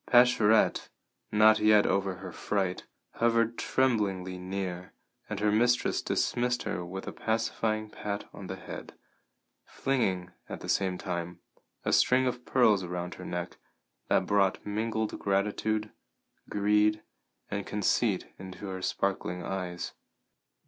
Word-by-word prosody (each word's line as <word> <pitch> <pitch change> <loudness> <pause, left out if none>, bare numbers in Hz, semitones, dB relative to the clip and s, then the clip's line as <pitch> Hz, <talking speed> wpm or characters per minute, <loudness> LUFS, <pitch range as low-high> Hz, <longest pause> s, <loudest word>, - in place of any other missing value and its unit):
Pascherette, 120 -3 +4 0.4
not 110 0 +6
yet 105 -1 +5
over 95 -1 +1
her - - -8
fright, 95 -3 -2 0.3
hovered 115 0 +2
tremblingly 100 -10 0
near, 90 -1 -4 0.4
and 105 -2 -3
her 105 0 +2
mistress 120 +3 +2
dismissed 125 0 0
her 90 - -3
with 95 +2 -6
a - - -4
pacifying 110 -1 -1
pat 105 -1 -5
on 95 - -8
the 95 - -4
head, - - -9 0.7
flinging, 95 -9 -1 0.2
at - - -6
the - - -7
same 95 -2 +1
time, 85 -1 -4 0.5
a - - +1
string 130 +1 +4
of 125 -1 -2
pearls 110 -6 +4
around 90 0 -4
her - - -9
neck 90 0 -4 0.5
that 95 - +2
brought 100 -1 +2
mingled 110 +1 -2
gratitude, 105 +2 0 0.6
greed, 105 +1 +2 0.5
and - - -3
conceit - - +1
into 95 +1 -8
her 95 -1 -5
sparkling 90 -2 -1
eyes. 90 -2 -4
100 Hz, 130 wpm, -29 LUFS, 95-110 Hz, 0.7 s, not